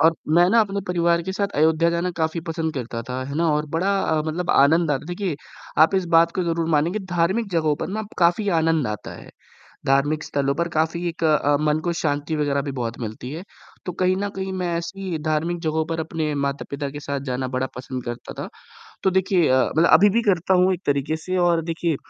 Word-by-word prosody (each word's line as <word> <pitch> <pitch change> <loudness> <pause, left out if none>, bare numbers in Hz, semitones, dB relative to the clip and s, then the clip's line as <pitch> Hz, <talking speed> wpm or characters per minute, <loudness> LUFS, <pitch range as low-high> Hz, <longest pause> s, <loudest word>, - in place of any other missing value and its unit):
और 160 +2 +5 0.2
मैं 175 +1 +6
ना 230 +1 +5
अपने 200 -1 -1
परिवार 170 -1 +2
के 190 +3 -4
साथ 200 +1 -1
अयोध्या 160 +2 +3
जाना 170 +2 -1
काफ़ी 160 +1 -1
पसंद 165 -1 -3
करता 120 -2 -4
था, 130 +1 -3
है 140 - -5
ना? 170 +1 +2
और 150 +1 0
बड़ा 195 +4 +1
अ, 155 -4 +1
मतलब 175 +3 -1
आनंद 160 +3 +4
आता 135 -1 0
है। - - -12
देखिए, 175 -3 -3 0.4
आप 160 +5 +5
इस 190 - +2
बात 170 0 +5
को 185 - 0
ज़रूर 165 -1 -1
मानें 155 +3 +2
कि 215 - -1
धार्मिक 185 +3 0
जगहों 155 -3 +2
पर - - -3
ना 215 +3 -3
अप 210 - -9
काफ़ी 175 +4 +3
आनंद 160 -4 +1
आता 105 0 -5
है, - - -12 0.6
धार्मिक 145 +3 +2
स्थलों 140 -1 -1
पर 170 +3 -1
काफ़ी 165 +2 -1
एक 165 0 -4
अ, 145 -2 +3
मन 150 0 +2
को 175 - 0
शांति 145 +1 -1
वग़ैरह 145 -2 0
भी 140 0 -4
बहुत 115 0 -3
मिलती 115 +3 -6
है, 165 +4 -6 0.4
तो 180 - -2
कहीं 185 +1 +1
न 205 +1 -2
कहीं 190 0 -3
मैं 180 -2 -2
ऐसी 175 0 -4
धार्मिक 160 +3 0
जगहों 160 -1 0
पर 165 -1 -3
अपने 160 -2 -2
माता-पिता 140 0 -4
के 145 +1 -7
साथ 140 -1 -3
जाना 130 +1 -2
बड़ा 130 +1 0
पसंद 125 0 -6
करता 120 0 -6
था। - - -6 0.6
तो 190 - +4
देखिए 190 -2 +2
अ, 130 0 +4
मतलब 165 - +5
अभी 195 +6 +7
भी 230 +4 +2
करता 180 +1 +1
हूँ 185 +1 +4
एक 180 - -6
तरीके 140 +2 0
से 185 +3 -3
और 175 -2 +3
देखिए 165 -1 -1
165 Hz, 230 wpm, -23 LUFS, 145-180 Hz, 0.6 s, अभी